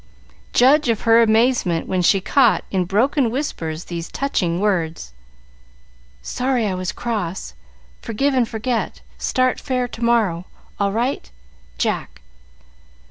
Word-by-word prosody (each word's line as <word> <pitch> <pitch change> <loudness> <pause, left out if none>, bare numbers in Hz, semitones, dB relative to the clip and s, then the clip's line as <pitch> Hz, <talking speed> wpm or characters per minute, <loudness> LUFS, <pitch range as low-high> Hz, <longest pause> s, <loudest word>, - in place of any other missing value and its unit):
Judge 275 +2 +4
of 225 -2 +1
her 230 0 +5
amazement 220 -6 +2
when 185 -1 0
she 195 +3 +4
caught 245 +5 +3
in 185 -2 0
broken 235 - +2
whispers 175 - -3
these 170 -1 -6
touching 180 -11 -1
words: 165 - -1 1.1
"Sorry 250 -2 -1
I 200 - -1
was 185 +1 -3
cross. 195 - -4 0.5
Forgive 270 +6 0
and 250 -3 +1
forget. 230 +1 -2 0.2
Start 255 -1 +1
fair 250 -1 -1
to 235 - -7
morrow. 215 -8 +1 0.3
All 200 -1 +1
right. 235 - -2 0.5
Jack." - - -2
220 Hz, 125 wpm, -20 LUFS, 180-250 Hz, 1.1 s, her